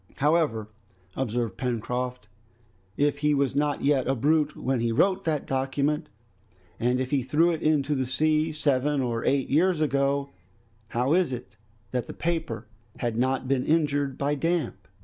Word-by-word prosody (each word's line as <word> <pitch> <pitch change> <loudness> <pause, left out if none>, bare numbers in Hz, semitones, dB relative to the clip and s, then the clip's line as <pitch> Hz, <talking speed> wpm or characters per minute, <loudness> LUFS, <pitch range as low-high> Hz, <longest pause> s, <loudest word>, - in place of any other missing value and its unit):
"However," 145 -8 +1 0.5
observed 120 -5 -2
Pencroft, 125 -1 -3 0.7
"if 145 0 +1
he 150 0 +2
was 140 -1 +1
not 145 0 0
yet 140 -3 +2
a 135 - +2
brute 150 +3 +2
when 130 -1 -1
he 115 0 0
wrote 185 +10 +2
that 155 -3 0
document, 140 +4 -1 0.7
and 125 +2 +1
if 130 0 -2
he 140 -2 +2
threw 150 +7 +3
it 160 - -3
into 150 -2 +2
the 130 -2 -1
sea 155 +4 +1
seven 145 -1 +1
or 120 -2 -1
eight 140 -1 +1
years 170 +3 +3
ago, 140 -1 +1 0.6
how 125 +6 0
is 175 -5 +2
it 125 -3 -7 0.4
that 125 -1 -2
the - - -6
paper 160 -10 -2 0.3
has 120 -2 -1
not 130 +3 0
been 130 -1 +1
injured 145 -4 +1
by 145 +1 0
damp?" 165 +3 -1
140 Hz, 160 wpm, -26 LUFS, 125-150 Hz, 0.7 s, threw